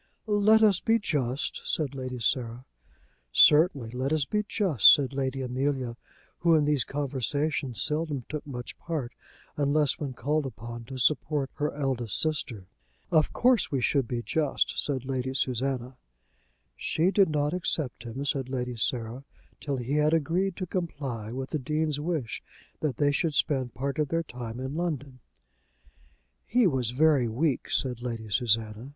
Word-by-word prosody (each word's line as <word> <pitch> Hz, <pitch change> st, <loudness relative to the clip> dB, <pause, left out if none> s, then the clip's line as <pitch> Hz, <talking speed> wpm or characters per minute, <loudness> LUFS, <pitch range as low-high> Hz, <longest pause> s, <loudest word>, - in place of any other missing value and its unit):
"Let 215 Hz, +1 st, +4 dB
us 205 Hz, -4 st, +5 dB
be 225 Hz, 0 st, +3 dB
just," 145 Hz, -, -2 dB
said 145 Hz, -4 st, -1 dB
Lady 130 Hz, -2 st, -5 dB
Sarah. 120 Hz, +1 st, -1 dB, 0.7 s
"Certainly, 145 Hz, -, +5 dB
let 130 Hz, +3 st, -2 dB
us 155 Hz, -3 st, +2 dB
be 210 Hz, +8 st, 0 dB
just," 195 Hz, -, +5 dB
said 140 Hz, -2 st, +3 dB
Lady 135 Hz, -1 st, -2 dB
Amelia, 130 Hz, -1 st, -1 dB, 0.4 s
who 170 Hz, -1 st, +4 dB
in 150 Hz, -2 st, +3 dB
these 145 Hz, -3 st, +2 dB
conversations 140 Hz, -1 st, -1 dB
seldom 150 Hz, -4 st, -1 dB
took 150 Hz, 0 st, -5 dB
much 125 Hz, -3 st, -7 dB
part, 155 Hz, -8 st, -4 dB, 0.4 s
unless 145 Hz, +1 st, +2 dB
when 140 Hz, -4 st, -4 dB
called 150 Hz, +2 st, -1 dB
upon 115 Hz, 0 st, -8 dB
to 130 Hz, +2 st, -7 dB
support 145 Hz, +1 st, +1 dB
her 150 Hz, +1 st, -1 dB
eldest 130 Hz, -6 st, 0 dB
sister. 130 Hz, -10 st, -2 dB, 0.5 s
"Of 155 Hz, -2 st, +3 dB
course 245 Hz, -5 st, +3 dB
we 135 Hz, -, +1 dB
should 130 Hz, 0 st, +1 dB
be 120 Hz, -1 st, -3 dB
just," 150 Hz, +1 st, 0 dB
said 135 Hz, -3 st, -2 dB
Lady 130 Hz, 0 st, -2 dB
Susanna. 130 Hz, 0 st, -1 dB, 0.8 s
"She 170 Hz, +4 st, +1 dB
did 195 Hz, -3 st, +4 dB
not 150 Hz, 0 st, 0 dB
accept 160 Hz, -7 st, -1 dB
him," 125 Hz, +4 st, -5 dB
said 135 Hz, -2 st, -1 dB
Lady 125 Hz, -2 st, -3 dB
Sarah, 115 Hz, +2 st, -2 dB, 0.4 s
"till 140 Hz, -2 st, -3 dB
he 130 Hz, +4 st, -1 dB
had 150 Hz, +2 st, +3 dB
agreed 175 Hz, +4 st, 0 dB
to 185 Hz, -, -3 dB
comply 140 Hz, -, -4 dB
with 130 Hz, +2 st, -5 dB
the 155 Hz, -, -1 dB
Dean's 150 Hz, +1 st, -1 dB
wish 150 Hz, -6 st, -3 dB, 0.4 s
that 145 Hz, -6 st, -2 dB
they 145 Hz, -1 st, +3 dB
should 155 Hz, +1 st, 0 dB
spend 130 Hz, -6 st, 0 dB
part 140 Hz, +2 st, -3 dB
of 150 Hz, -, +2 dB
their 165 Hz, +4 st, 0 dB
time 120 Hz, -5 st, -7 dB
in 130 Hz, +1 st, -4 dB
London." 145 Hz, -6 st, -3 dB, 1.3 s
"He 245 Hz, +1 st, +3 dB
was 130 Hz, -9 st, +1 dB
very 140 Hz, -1 st, +3 dB
weak," 130 Hz, +5 st, -1 dB
said 125 Hz, -3 st, 0 dB
Lady 115 Hz, -3 st, -5 dB
Susanna. 110 Hz, +1 st, 0 dB
140 Hz, 155 wpm, -28 LUFS, 125-155 Hz, 1.3 s, us